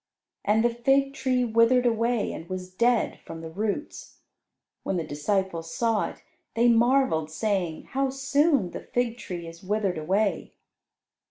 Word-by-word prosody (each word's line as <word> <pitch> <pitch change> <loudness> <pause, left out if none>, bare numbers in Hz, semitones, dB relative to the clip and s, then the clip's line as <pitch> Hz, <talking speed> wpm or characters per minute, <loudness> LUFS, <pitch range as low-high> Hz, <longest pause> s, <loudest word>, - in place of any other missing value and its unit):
And 220 +3 +2
the 240 - +3
fig 270 +4 +2
tree 255 -2 +1
withered 230 +2 +4
away 230 -1 +1
and 165 - -8
was 185 0 -5
dead 235 +3 +1
from 165 0 -8
the 160 -1 -8
roots. 210 - -4 0.6
When 190 - -2
the 170 - -1
disciples 165 +2 -2
saw 230 -2 +1
it, - - -14 0.3
they 235 +1 +4
marvelled, 235 - +3
saying, 180 -2 -1
"How 270 0 +1
soon 270 - +2
the - - -6
fig 245 -1 -2
tree 175 -2 -6
is 165 0 -10
withered 195 -3 -1
away!" 190 +3 0
220 Hz, 150 wpm, -26 LUFS, 180-245 Hz, 0.6 s, withered